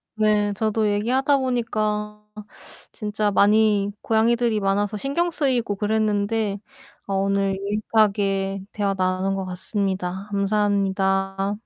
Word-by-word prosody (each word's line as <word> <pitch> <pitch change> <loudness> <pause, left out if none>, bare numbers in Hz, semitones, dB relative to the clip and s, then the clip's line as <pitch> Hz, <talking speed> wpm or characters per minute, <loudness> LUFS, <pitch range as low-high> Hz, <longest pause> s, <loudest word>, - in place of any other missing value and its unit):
네 210 -1 +2
저도 215 +1 0
얘기하다 260 +7 +2
보니까 215 -4 -2 0.7
진짜 210 -1 -2
많이 205 0 +3
고양이들이 230 0 +2
많아서 205 +1 0
신경쓰이고 275 -5 0
그랬는데 210 0 0 0.5
어 195 - -2
오늘 195 0 +1
유익하게 200 -1 0
대화 200 -2 -1
나눈 185 +1 0
것 190 -1 -3
같습니다. 190 0 -3
감사합니다. 195 -1 0
205 Hz, 270 characters per minute, -23 LUFS, 195-220 Hz, 0.7 s, 많이